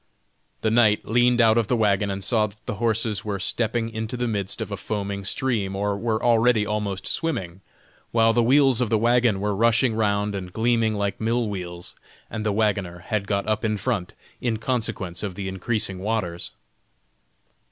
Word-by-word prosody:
The 110 - +1
knight 110 -2 +4
leaned 120 +2 +3
out 115 0 +5
of 115 - 0
the 125 - +2
wagon 105 -2 +2
and 95 0 -4
saw 110 +1 +2
that 105 +1 -18
the - - -3
horses 110 -3 0
were 105 -2 -2
stepping 115 +4 -1
into 110 +2 -4
the 120 0 -1
midst 100 -4 -2
of - - -4
a - - -1
foaming 100 -2 -4
stream 100 -3 -1
or 100 +1 0
were 110 +1 -1
already 115 -2 +4
almost 105 -2 -3
swimming, 95 - -2 0.5
while 115 -1 +3
the 120 - +3
wheels 130 0 +4
of 120 - +1
the 110 - +3
wagon 120 -2 +3
were 105 0 -1
rushing 115 +3 +3
round 105 -1 0
and 95 -2 -5
gleaming 115 -1 +1
like 100 0 -2
mill 115 +1 +1
wheels, 90 -3 -6 0.4
and 110 -1 -3
the 105 - +1
wagoner 100 -4 0
had 105 -2 -1
got 100 0 -1
up 110 -1 0
in 110 -1 0
front, 105 -6 -2 0.3
in 115 -3 0
consequence 110 -7 -3
of 100 -4 -4
the 100 0 -4
increasing 95 +1 -2
waters. 95 -4 -2
110 Hz, 185 wpm, -24 LUFS, 100-115 Hz, 0.5 s, out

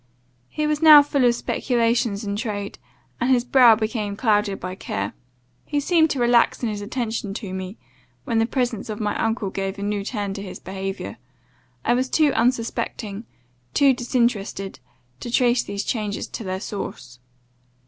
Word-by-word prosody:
He 305 - -2
was 300 0 0
now 305 -2 +10
full 280 -2 +1
of 240 -1 +4
speculations 235 -3 0
in 200 -1 -3
trade, 205 -3 -4 0.4
and 250 - 0
his 250 -2 +4
brow 245 -3 +7
became 215 -2 -2
clouded 210 -2 +1
by 185 +1 -5
care. 100 - -4 0.5
He 290 - -1
seemed 320 +2 +3
to 275 - -2
relax 240 0 +3
in 235 - +1
his 205 -1 -4
attention 220 -2 -3
to 200 -5 -5
me, 190 +2 -6 0.5
when 225 - 0
the 225 - +2
presence 245 -3 -2
of 210 - -4
my 210 -1 -1
uncle 225 -3 -1
gave 195 0 -3
a 200 - -5
new 205 -1 -1
turn 205 -2 -3
to 200 - -6
his 190 -2 -8
behaviour. 190 - -5 0.7
I 240 - +3
was 255 +1 0
too 300 -1 +3
unsuspecting, 230 -3 -1 0.5
too 275 -1 +5
disinterested, 235 -6 -1 0.4
to 240 - -6
trace 240 0 +3
these 200 0 -4
changes 210 -3 -2
to - - -6
their 185 -1 -4
source. 125 -13 -6
225 Hz, 170 wpm, -23 LUFS, 200-245 Hz, 0.7 s, now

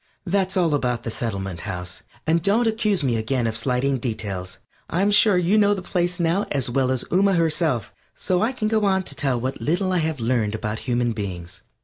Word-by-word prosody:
That's 190 0 0
all 170 -4 +2
about 125 -4 0
the 115 - -3
Settlement 95 -6 -3
House, 90 -1 -5 0.2
and 165 +1 +2
don't 210 +7 +2
accuse 215 -6 +1
me 120 -4 +1
again 120 +2 -1
of 110 -1 -1
slighting 125 +3 0
details. 100 -6 -4 0.3
I'm 195 +5 +1
sure 205 -1 +5
you 180 +5 +3
know 205 0 +4
the 190 - -6
place 175 0 0
now 170 +4 +1
as 130 -4 0
well 130 0 +1
as 130 -2 0
Ooma 195 +2 +3
herself, 160 - +1 0.2
so 180 -1 0
I 225 +4 +2
can 250 -5 -2
go 215 -1 +2
on 190 -1 +2
to - - -6
tell 135 -4 0
what 130 +3 -4
little 185 +4 0
I 180 - +2
have 160 -3 -1
learned 115 -2 0
about 110 0 -3
human 120 -2 0
beings. 95 -4 -6
140 Hz, 210 wpm, -23 LUFS, 115-185 Hz, 0.3 s, sure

